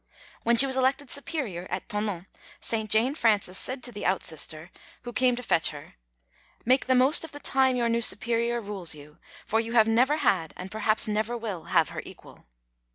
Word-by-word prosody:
When 235 Hz, +1 st, +2 dB
she 265 Hz, -, +10 dB
was 265 Hz, -1 st, -1 dB
elected 265 Hz, +1 st, 0 dB
Superior 260 Hz, -, -4 dB
at 185 Hz, +1 st, -4 dB
Thonon 205 Hz, -4 st, -3 dB, 0.3 s
St. 220 Hz, -2 st, -3 dB
Jane 230 Hz, +6 st, +3 dB
Frances 210 Hz, -, +1 dB
said 255 Hz, 0 st, -2 dB
to 245 Hz, -, -3 dB
the 210 Hz, -, -8 dB
outsister 160 Hz, -2 st, -2 dB, 0.3 s
who 240 Hz, -1 st, -7 dB
came 250 Hz, +1 st, +2 dB
to 250 Hz, -, -7 dB
fetch 170 Hz, -7 st, +2 dB
her: 145 Hz, -2 st, -11 dB, 0.7 s
"Make 255 Hz, +2 st, +2 dB
the 260 Hz, -, +3 dB
most 260 Hz, +6 st, +5 dB
of 320 Hz, -, -9 dB
the 290 Hz, -, -8 dB
time 265 Hz, -2 st, +2 dB
your 240 Hz, -1 st, 0 dB
new 230 Hz, 0 st, 0 dB
Superior 235 Hz, +1 st, 0 dB
rules 195 Hz, -6 st, -1 dB
you, 150 Hz, 0 st, -15 dB, 0.3 s
for 225 Hz, -, 0 dB
you 230 Hz, +1 st, -4 dB
have 225 Hz, -2 st, +5 dB
never 250 Hz, +7 st, +3 dB
had 165 Hz, -, 0 dB
and 185 Hz, +1 st, -8 dB
perhaps 215 Hz, 0 st, +1 dB
never 215 Hz, +3 st, -1 dB
will 210 Hz, -7 st, -6 dB
have 165 Hz, -5 st, +2 dB
her -, -, -6 dB
equal." -, -, -15 dB
225 Hz, 195 wpm, -26 LUFS, 190-255 Hz, 0.7 s, she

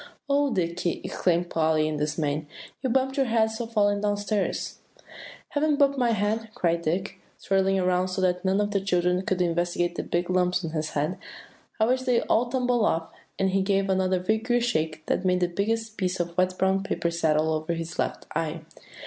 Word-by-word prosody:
"O 285 Hz, 0 st, +2 dB
Dicky!" 170 Hz, -2 st, -1 dB
exclaimed 175 Hz, -1 st, 0 dB
Polly 155 Hz, -1 st, +2 dB
in 155 Hz, -1 st, -2 dB
dismay, 150 Hz, 0 st, -1 dB, 0.3 s
"you've 260 Hz, -, -1 dB
bumped 265 Hz, +2 st, +1 dB
your 270 Hz, -2 st, +2 dB
head 220 Hz, -1 st, +2 dB
so 225 Hz, +1 st, -4 dB
falling 205 Hz, -3 st, +2 dB
down 205 Hz, -1 st, +1 dB
stairs." 205 Hz, 0 st, -2 dB, 0.7 s
"Haven't 300 Hz, 0 st, +1 dB
bumped 280 Hz, -1 st, +3 dB
my 245 Hz, -1 st, +3 dB
head," 220 Hz, +1 st, 0 dB
cried 170 Hz, -6 st, +1 dB
Dick, 175 Hz, +5 st, -2 dB, 0.3 s
whirling 195 Hz, 0 st, +3 dB
around 180 Hz, 0 st, +2 dB
so 185 Hz, +1 st, -3 dB
that 180 Hz, -1 st, +1 dB
none 190 Hz, +1 st, +2 dB
of 205 Hz, 0 st, 0 dB
the 200 Hz, -1 st, +1 dB
children 180 Hz, -1 st, +1 dB
could 190 Hz, -1 st, 0 dB
investigate 175 Hz, 0 st, 0 dB
the -, -, -3 dB
big 175 Hz, 0 st, -1 dB
lumps 180 Hz, -1 st, +1 dB
on 160 Hz, -, -4 dB
his 155 Hz, -1 st, -2 dB
head. 155 Hz, +6 st, -1 dB, 0.6 s
"I 220 Hz, -, +4 dB
wish 255 Hz, +2 st, +1 dB
they'd 250 Hz, -2 st, +2 dB
all 235 Hz, +2 st, +1 dB
tumble 245 Hz, -2 st, +1 dB
off;" 165 Hz, -5 st, 0 dB, 0.3 s
and 190 Hz, -1 st, +1 dB
he 195 Hz, +1 st, +2 dB
gave 195 Hz, 0 st, +1 dB
another 185 Hz, 0 st, +2 dB
vigorous 225 Hz, +5 st, +1 dB
shake, 160 Hz, -7 st, -1 dB
that -, -, 0 dB
made 180 Hz, -1 st, +2 dB
the 180 Hz, -, +3 dB
biggest 220 Hz, +5 st, -2 dB
piece 185 Hz, -1 st, -1 dB
of 170 Hz, -1 st, -2 dB
wet 185 Hz, 0 st, +1 dB
brown 190 Hz, +1 st, +2 dB
paper 195 Hz, -4 st, -1 dB
settle 160 Hz, -1 st, +1 dB
over 155 Hz, +2 st, -2 dB
his 165 Hz, 0 st, -5 dB
left -, -, -2 dB
eye. 165 Hz, 0 st, -2 dB
185 Hz, 195 wpm, -26 LUFS, 170-220 Hz, 0.7 s, I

